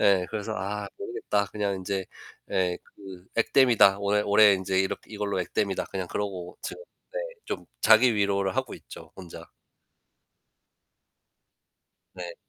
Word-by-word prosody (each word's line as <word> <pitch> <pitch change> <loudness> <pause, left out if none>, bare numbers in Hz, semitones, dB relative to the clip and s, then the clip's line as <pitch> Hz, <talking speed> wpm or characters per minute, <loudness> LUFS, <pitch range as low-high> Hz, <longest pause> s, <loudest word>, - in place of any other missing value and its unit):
예. 95 -3 +4
그래서 110 0 -3
'아 100 +1 -4
모르겠다. 100 -1 -1
그냥 100 -2 -1
인제 95 0 -3 0.5
예. 90 -2 +1
그 95 -3 -13
액땜이다. 115 -5 +5
올해 100 +1 +2
올해 105 0 +6
인제 95 0 0
이렇게 95 +3 -3
이걸로 100 -2 -2
액땜이다.' 95 +2 -1
그냥 95 -2 -4
그러고 95 -3 -4
지금 470 - -6 0.3
네 - - -1 0.3
좀 - - -5 0.2
자기 115 +2 +6
위로를 100 -2 +1
하고 - - -1
있죠 - - -12
혼자. 90 -3 -10 2.7
네. 90 -1 -7
100 Hz, 270 characters per minute, -27 LUFS, 95-105 Hz, 2.7 s, 올해